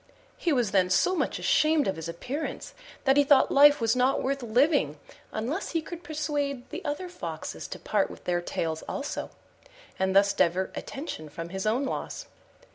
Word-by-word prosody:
He 340 - -1
was 245 -8 +1
then 185 -2 +3
so 190 - +3
much - - -1
ashamed 310 -2 +3
of 190 - 0
his 160 +1 -6
appearance 255 - -5 0.3
that 270 0 +4
he 285 - +7
thought 280 -1 +5
life 290 +1 +7
was 225 0 +2
not 255 +2 +2
worth 275 +1 -1
living 240 - +2 0.3
unless 265 - -3
he 330 - +1
could 345 +1 -8
persuade 290 -5 -2
the - - -6
other 295 +6 -3
Foxes 355 - -6
to - - -6
part - - 0
with - - -11
their 175 -1 0
tails 160 -2 -3
also, 285 - -4 0.7
and 190 0 +1
thus 200 0 +5
divert 185 +1 +1
attention 270 - -6
from 165 +3 -7
his 190 +3 -3
own 245 +6 +1
loss. - - -4
255 Hz, 180 wpm, -27 LUFS, 190-290 Hz, 0.7 s, he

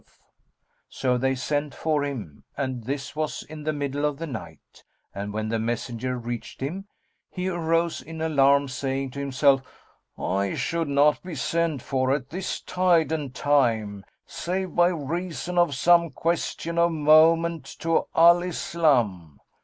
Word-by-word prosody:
"[FN#216] - - -36 0.8
So 125 -2 0
they 135 +1 +1
sent 145 +2 -2
for 155 -2 0
him, 110 - -6
and 130 -4 -3
this 140 +2 -4
was 155 0 -3
in 155 -1 -10
the 155 - +1
middle 145 -1 -3
of 150 -1 0
the 165 - -4
night; 90 - -10 0.3
and 100 +1 -5
when 110 +1 -3
the 115 0 0
messenger 120 +2 -3
reached 120 -1 -6
him, 180 +9 -4 0.4
he 180 0 -4
arose 165 -2 0
in 160 +4 -9
alarm, 140 -3 +3
saying 135 +1 -3
to 140 - -7
himself, 140 0 +3 0.6
"I 100 +1 -1
should 170 -2 -1
not 145 +1 +3
be 180 -3 -7
sent 160 0 -1
for 130 -1 0
at 135 -2 -6
this 185 +3 -4
tide 175 -3 +2
and 150 -5 -2
time, 115 -8 +1 0.2
save 185 +1 -3
by 175 0 +5
reason 175 +2 -2
of 170 -5 +3
some 170 +4 +4
question 170 +2 -2
of 170 0 +4
moment 160 +1 +4 0.2
to 165 0 +1
Al 170 +1 +7
Islam." 125 - 0
145 Hz, 155 wpm, -25 LUFS, 130-165 Hz, 0.8 s, Al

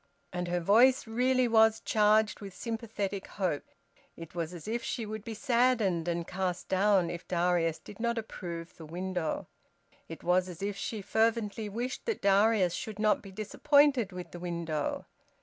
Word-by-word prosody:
And 180 0 -2
her 175 0 0
voice 235 +9 +5
really 250 +2 +2
was 220 -1 +5
charged 215 0 +3
with 195 -2 -8
sympathetic 215 -4 -4
hope. 180 -7 -2 0.5
It 165 -1 -10
was 170 -1 -3
as 175 -1 -9
if 235 +2 -2
she 230 - -3
would 215 0 -6
be 225 -1 -6
saddened 235 - +2
and 170 -1 -1
cast 180 -1 -3
down 190 -2 +3
if 170 0 -7
Darius 175 -2 +1
did 205 - -13
not 235 0 0
approve 170 -6 -6
the 160 - -9
window. 180 -1 -3 0.6
It 165 - -8
was 180 +1 +2
as 180 +1 -8
if 205 0 -2
she 205 +1 -4
fervently 220 -1 0
wished 245 - -4
that 455 - -2
Darius 200 -2 +4
should 215 -2 -5
not 215 0 +2
be 195 - -11
disappointed 255 +3 +3
with 180 -2 -8
the 175 - -8
window. 170 -4 -3
200 Hz, 165 wpm, -30 LUFS, 175-225 Hz, 0.6 s, voice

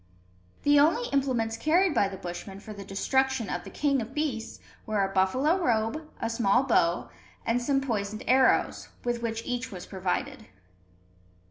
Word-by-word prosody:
The 290 0 +5
only 340 +12 +3
implements 245 -5 0
carried 330 +7 +3
by 205 -6 +3
the 195 -1 -7
Bushmen 185 +3 -7
for 215 +1 -9
the 200 -1 -8
destruction 265 +4 0
of 175 - -3
the - - -9
king 280 -3 +1
of 235 +4 -8
beasts 285 -7 -2 0.3
were 210 -2 +1
a 195 - -6
buffalo 260 - +2
robe, 240 +6 0
a - - -1
small 230 +1 +2
bow, 170 - +1 0.3
and 240 +2 +1
some 275 +2 +1
poisoned 215 -5 -3
arrows, 260 0 +3
with 240 -1 -1
which 225 -1 -3
each 250 +1 -3
was 180 -2 -7
provided. 185 -2 -3
235 Hz, 160 wpm, -28 LUFS, 200-270 Hz, 0.3 s, The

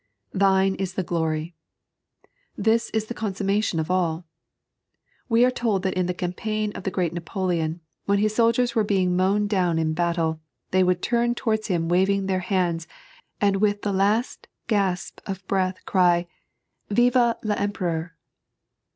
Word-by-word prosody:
" 100 - -51 0.2
Thine 190 0 +3
m 195 - -1
the 190 - -1
glory." 160 -1 -2 1.0
This 225 +1 +2
is 220 -1 -1
the 240 - -5
consummation 200 -4 -1
of 160 +3 -2
all. 170 -2 0 1.0
We 230 +1 +5
are 255 - +3
told 220 -6 -1
that 190 - 0
in 185 -1 0
the 180 - -1
campaign 210 +4 -2
of - - -7
the - - +1
great 175 -3 -1
Napoleon, 170 -2 -2 0.2
when 200 0 +2
his 210 +1 +1
soldiers 235 +2 +2
were 225 - +2
being 190 -3 +1
mown 195 +3 +2
down 185 -5 +1
in 160 -1 0
battle, 165 -1 0 0.3
they 185 - +3
would 180 -1 +1
turn 240 0 +1
towards 220 -3 -1
him 170 -4 0
waving 190 +3 +2
their 190 -1 0
hands, 175 -3 -1 0.5
and 200 -1 +2
with 205 0 +1
the 205 - 0
last 205 +5 0 0.2
gasp 195 -5 -1
of 190 -1 -5
breath 185 -1 0
cry; 175 -2 +3 0.3
" - - -51
Ftw 240 +2 +3
VEmpere:ur!" 180 -6 -2
190 Hz, 160 wpm, -24 LUFS, 175-210 Hz, 1.0 s, We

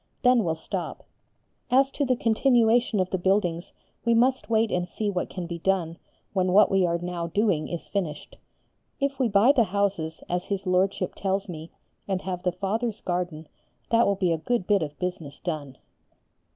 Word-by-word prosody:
Then 250 -2 +5
we'll 165 -3 0
stop. 160 - -5 0.7
As 270 +2 +4
to 285 - -1
the 255 -1 +2
continuation 235 -1 +3
of 185 0 0
the 185 - 0
buildings, 175 -2 0 0.3
we 235 -1 +3
must 255 +2 +2
wait 225 -1 +2
and 180 0 0
see 205 +4 -2
what 180 -2 -2
can 180 -2 -5
be 170 0 -5
done 170 -2 0 0.3
when 185 -2 +1
what 210 +2 +6
we 195 -1 +3
are 170 0 +1
now 175 -1 -4
doing 185 -3 +1
is 170 - -6
finished. 175 -7 -4 0.6
If 275 -1 -1
we 255 - +3
buy 210 +5 +5
the 245 -5 +3
houses, 190 -5 -1
as 180 0 -2
his 200 -1 -3
Lordship 185 +2 +1
tells 195 +1 -1
me, 165 -2 -7 0.4
and 190 -2 -2
have 180 -1 -4
the 180 -1 0
Fathers' 210 +5 -2
garden, 175 -3 -3 0.4
that 230 0 +4
will 200 - +2
be 185 -3 +1
a 165 - 0
good 235 +3 -1
bit 200 -1 +3
of 150 -2 -4
business 165 -6 -5
done. 145 -6 -5
190 Hz, 185 wpm, -26 LUFS, 175-220 Hz, 0.7 s, what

